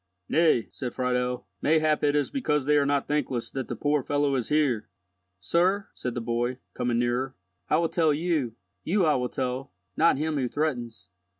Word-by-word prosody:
"Nay," 155 -8 +3
said 125 -3 -5
Friedel, 125 -2 -1 0.2
"mayhap 155 -1 +2
it 145 0 +3
is 145 -1 +1
because 150 - 0
they 150 +1 +3
are 145 -1 +3
not 140 -1 +1
thankless 145 -5 -1
that 135 -2 -4
the - - -4
poor 145 0 +1
fellow 145 +1 +1
is 125 -4 -1
here." 135 -8 +1 0.5
"Sir," 180 - +1
said 125 -2 -4
the - - -1
boy, 120 +2 -1 0.2
coming 120 -1 0
nearer, 120 +2 0 0.3
"I 155 - +4
will 165 0 +2
tell 160 -3 +2
you—you 145 - -1
I 155 - +4
will 125 -2 0
tell—not 125 - -1
him 155 +1 -1
who 130 -2 0
threatens. 120 - -3
135 Hz, 175 wpm, -27 LUFS, 120-155 Hz, 0.5 s, I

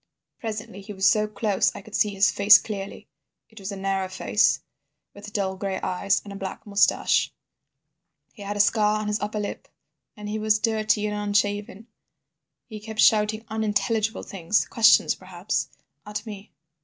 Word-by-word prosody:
"Presently 215 -3 -6
he 200 +2 -9
was 190 0 -1
so 215 -1 +4
close 210 -1 0
I - - -9
could 220 - -15
see 210 - +2
his 200 0 +2
face 200 +1 +7
clearly. 200 -2 -7 0.4
It 220 - -13
was 195 +1 -6
a - - -5
narrow 195 -1 -2
face, 200 +3 +2 0.5
with 205 0 -11
dull 195 -3 -2
gray 190 0 -3
eyes, 195 +2 0
and 205 - -9
a - - -8
black 195 -1 -7
moustache. 200 -1 +2 1.0
He 215 - -14
had 205 +1 -4
a - - +5
scar 210 0 +2
on 215 - -4
his 210 0 -1
upper 210 +1 -3
lip, 205 - -5 0.5
and 210 0 -7
he 215 +1 -3
was 215 0 +2
dirty 215 -2 0
and 210 0 -2
unshaven. 205 0 -1 0.8
He 215 -3 -9
kept 220 0 -9
shouting 215 +1 +3
unintelligible 220 0 -1
things, 195 +2 0
questions, 225 -1 +5
perhaps, - - -4 0.3
at 210 +1 -6
me. 210 -1 -9
210 Hz, 165 wpm, -25 LUFS, 200-215 Hz, 1.0 s, face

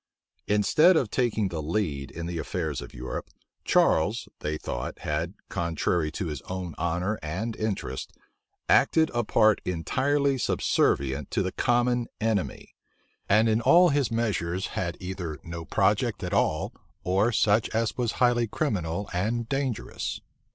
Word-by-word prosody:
Instead 155 - +5
of 120 -8 0
taking 110 -5 +1
the 80 -3 -4
lead 75 -4 -2
in 85 +1 -6
the 85 -1 -3
affairs 80 -5 -3
of - - -9
Europe, 65 +1 -6 0.3
Charles, 100 +9 +2
they 75 +1 -2
thought, - - -5
had, 80 +5 -2
contrary 85 -1 0
to 95 - -3
his 75 -5 -4
own 90 -3 -4
honor 90 +6 -1
and 95 +9 -3
interest, 100 -11 -3 0.6
acted 160 -1 +4
a 120 0 +1
part 110 -1 +3
entirely 135 - 0
subservient 70 - +1
to - - 0
the - - -2
common 120 0 +1
enemy; 110 -4 -2 0.6
and 110 +3 +5
in 110 +1 +2
all 175 +6 +6
his 140 -4 +1
measures 95 -6 -1
had 85 -1 -2
either 90 -4 -5
no 85 -1 -7
project - - +1
at - - -3
all, 85 +8 +1 0.3
or 95 +6 +2
such 110 0 +3
as 115 0 -1
was 120 -2 -1
highly 120 -2 +2
criminal 100 - -2
and 110 +6 -1
dangerous. 135 -5 -2
100 Hz, 145 wpm, -27 LUFS, 85-120 Hz, 0.6 s, all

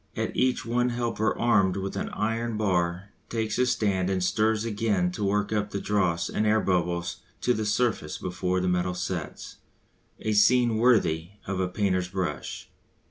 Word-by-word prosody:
At - - -2
each 130 -1 +1
one 120 +1 +1
a - - -3
helper 115 -2 -1
armed 100 -5 +3
with 95 0 -4
an - - -3
iron 115 +1 -2
bar 90 -2 0 0.2
takes 110 -2 -2
his 125 0 +3
stand 95 -3 0
and 95 -2 0
stirs 110 +3 +1
again 105 -5 0
to 105 - -4
work 105 +1 0
up 105 -1 -2
all - - 0
dross 90 -5 0
and 105 - 0
air 110 +1 +4
bubbles 85 -3 0 0.2
to 125 - +2
the 110 -2 -2
surface 105 -7 0
before 90 0 -2
the 90 - 0
metal 90 0 0
sets 90 -3 -5 0.6
a 110 - -1
scene 120 +2 +4
worthy 100 -8 +2
of 100 -2 -3
a 95 - +1
painter's 95 -1 0
brush. 90 -5 -4
100 Hz, 175 wpm, -27 LUFS, 90-110 Hz, 0.6 s, air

